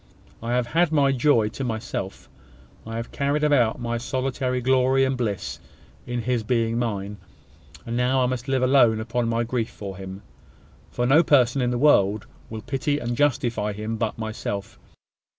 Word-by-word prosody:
I 115 +1 -2
have 125 -1 +1
had 165 +6 +1
my 140 -3 +3
joy 125 -5 +3
to 135 - -6
myself: 115 -3 -4 0.6
I 115 - -5
have 115 +1 -5
carried 145 +2 0
about 130 -7 +3
my 120 -1 -2
solitary 130 0 -2
glory 130 +1 +3
and 130 0 0
bliss 110 -7 -3 0.5
in 120 -1 -3
his 125 0 0
being 115 0 0
mine; 105 -3 -3 0.7
and 115 - -4
now 125 +2 +2
I - - +3
must 125 0 -3
live 135 -1 +1
alone 125 -4 +4
upon 115 +1 -1
my 115 0 +1
grief 115 -1 -2
for 100 -4 -8
him; 95 +1 -8 0.7
for 120 - -2
no 135 +4 +5
one 170 - +5
person 130 -2 +4
in 125 - +1
the 125 - -1
world 105 -7 +3 0.2
will 110 -1 -7
pity 145 +2 -1
and 120 -3 -3
justify 120 -6 0
him 110 +2 -4
but 110 -1 -2
myself. 110 -3 -5
120 Hz, 175 wpm, -24 LUFS, 110-130 Hz, 0.7 s, no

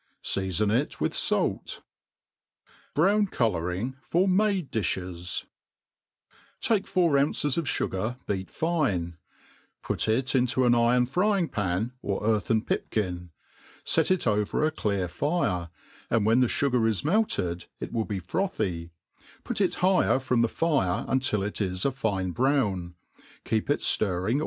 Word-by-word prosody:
Seafon 95 +2 +1
it 135 +5 -1
with - - 0
fait. - - 0 1.2
Brown 200 +6 +3
Colouring 105 - -1
for 175 +10 +1
fAode 195 -4 +1
£Jbit» 90 -4 -2 1.1
TAKE 215 -4 +1
four 170 -6 +3
ounces 145 0 +1
of 170 - -1
fugar, 110 -2 -2
beat 95 -2 -3
fine; 100 - -1 0.7
put - - -1
it 125 +4 +1
into 130 0 +2
an 120 - +5
iron 120 +1 +3
frying 180 - +1
pan, 105 +1 -1
or 100 +1 -3
earthen 110 0 +1
pipkirt'; 90 -4 -2 0.6
fet 160 - +2
ii 185 - +4
Qvct 105 - +1
a - - -9
clear 100 -10 -1
fire, 90 - -1 0.4
and 110 -3 +2
wbeii 115 +4 +4
the 125 - +4
fugac' 125 -3 +1
Id - - -6
melted 100 - 0
it - - -6
will 110 -2 -1
bb 100 -4 -4
frothy; 90 - -2 0.5
put - - -2
it - - +2
higher 185 -6 +3
from 130 -2 +1
the 115 - +3
£re 135 - 0
until 130 -6 0
it 105 +2 -4
is 90 -2 -1
a 140 - +3
fine 100 -8 -2
brown; 100 -8 0 0.5
keep 110 -1 0
itdirring. 110 -4 +2
115 Hz, 135 wpm, -27 LUFS, 95-145 Hz, 1.2 s, an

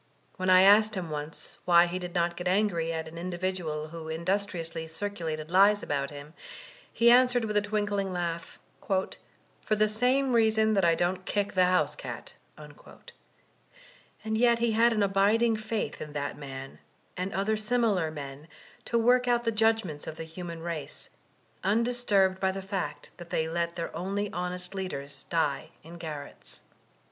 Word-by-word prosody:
When 185 0 -1
I 185 0 +8
asked 215 +2 +6
him 175 -4 -4
once 150 +1 -7
why 175 -1 +6
he 175 +1 -3
did 180 -1 -7
not 170 0 +1
get 175 +1 -4
angry 180 -4 +1
at 160 -1 -3
an 165 +1 -8
individual 175 -3 -3
who 160 -1 -8
industriously 170 -1 -2
circulated 165 -3 -4
lies 200 +3 +5
about 140 -1 -1
him, 145 +1 -10 0.6
he 235 +1 +5
answered 245 -1 +5
with 210 -1 -3
a 210 - +4
twinkling 205 -2 -1
laugh, 170 -2 -4 0.3
'Tor 190 -1 0 0.6
the 215 0 +3
same 250 +5 +2
reason 220 -1 +4
that 195 -2 +2
I 165 -1 +4
don't 180 +2 -1
kick 205 -1 -1
the 185 -1 +4
house 180 0 +2
cat" - - -8 0.2
And 220 - -11
yet 235 -1 +5
he 235 0 +1
had 230 +2 +4
an 215 -2 +2
abiding 205 +4 +3
faith 215 0 -3
in 150 -1 -7
that 145 -1 -3
man, 135 -2 -8 0.4
and 185 +1 -3
other 200 +3 0
similar 215 -6 +1
men, 145 -1 -8 0.4
to 235 - +1
work 245 +2 +4
out 240 -1 +2
the 230 - +1
judgments 220 -8 +1
of 155 - -6
the - - -5
human 165 0 -7
race, 165 -4 -5 0.5
undisturbed 205 -3 +2
by 190 0 +2
the 195 0 -6
fact 195 -1 -4
that 175 -1 -10
they 160 -1 0
let 170 +1 -2
their 170 -2 -5
only 195 +4 -2
honest 180 +1 -4
leaders 165 -8 -5
die 150 -5 -1
in 170 +2 -11
garrets. 155 -4 -7
185 Hz, 165 wpm, -28 LUFS, 165-215 Hz, 0.6 s, I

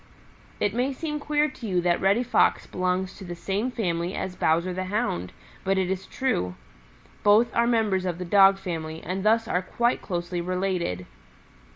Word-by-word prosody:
"It 205 -1 +1
may 250 +4 0
seem 300 +2 -4
queer 295 +1 +1
to 260 -5 -8
you 185 -3 +1
that 175 0 +1
Reddy 200 +6 +3
Fox 245 - +2
belongs 185 0 -1
to 195 - -9
the 175 -1 -6
same 200 +7 -2
family 180 -6 -2
as 185 -1 -4
Bowser 170 +3 +1
the 185 +1 -3
Hound, 185 - -2 0.3
but 195 0 +1
it 190 -1 +1
is 190 0 -3
true. 90 - -1 0.7
Both 215 +3 +4
are 235 0 +3
members 215 -6 +1
of 175 -2 -2
the 180 - -5
Dog 195 +1 +6
family 160 -4 -5
and 190 +2 -3
thus 225 +1 +3
are 180 - +1
quite 235 +6 0
closely 175 -1 -3
related. 180 - -2
190 Hz, 180 wpm, -26 LUFS, 175-225 Hz, 0.7 s, Dog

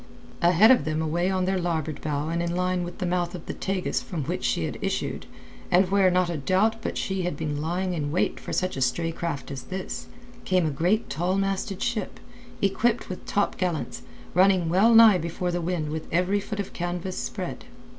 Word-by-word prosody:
Ahead 180 +7 +6
of 255 - +5
them 155 +1 -1
away 170 +3 0
on 185 -1 +1
their 190 0 +1
larboard 160 -4 -2
bow 150 0 -2
and 170 +1 -1
in 170 0 -1
line 180 0 0
with 175 0 -7
the - - -2
mouth 175 0 -1
of 175 - -8
the - - -4
Tagus 190 -1 -1
from 185 - -4
which 175 +6 -3
she - - +1
had - - -4
issued—and 80 - -2
where 195 -2 +5
not 180 0 +2
a 170 -2 -2
doubt 190 +10 +2
but - - -3
she 190 -1 -1
had 180 0 -2
been 150 -3 -2
lying 180 +3 -1
in 145 -4 -2
wait 175 - 0
for - - -8
such 185 0 0
stray 165 +6 +1
craft 160 -5 -4
as 135 -2 -6
this—came 190 0 -3
a 155 - 0
great 180 +10 +1
tall 180 +4 -1
masted 195 0 -1
ship, 235 -4 -2 0.4
equipped 215 +4 +1
with 185 - -7
top 205 - 0
gallants, 160 -9 -2 0.3
running 185 -2 +4
wellnigh 220 +2 +7
before 170 +2 -2
the 175 0 -1
wind 165 -3 -2
with 155 0 -5
every 180 +4 +2
foot 205 +1 -6
of 200 - -4
canvas 175 +1 -3
spread. - - -5
180 Hz, 195 wpm, -26 LUFS, 165-190 Hz, 0.4 s, wellnigh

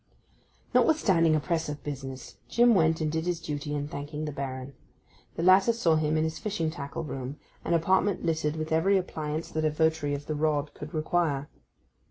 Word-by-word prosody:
Notwithstanding 175 - +4
a - - +2
press 165 0 -1
of 145 0 -6
business, 135 -3 -7
Jim 240 0 +5
went 160 -4 +3
and 155 -1 0
did 160 +2 -2
his 175 -2 0
duty 145 -2 -4
in 145 0 -2
thanking 150 +1 -5
the 150 - -3
Baron. 135 -1 -5 0.6
The 165 - -2
latter 190 +4 +6
saw 175 -9 +2
him 155 0 +1
in 155 - +2
his 160 0 -2
fishing 195 -7 -2
tackle 155 +1 -5
room, 135 -1 -5 0.3
an 170 - +1
apartment 185 +3 +2
littered 155 -2 0
with 155 0 -4
every 185 +5 +3
appliance 155 -3 -3
that 155 - -1
a 155 - +3
votary 155 -2 +1
of 145 +1 -7
the 155 - -2
rod 150 -1 0
could 150 +2 -8
require. 155 -3 0
155 Hz, 190 wpm, -28 LUFS, 145-165 Hz, 0.6 s, latter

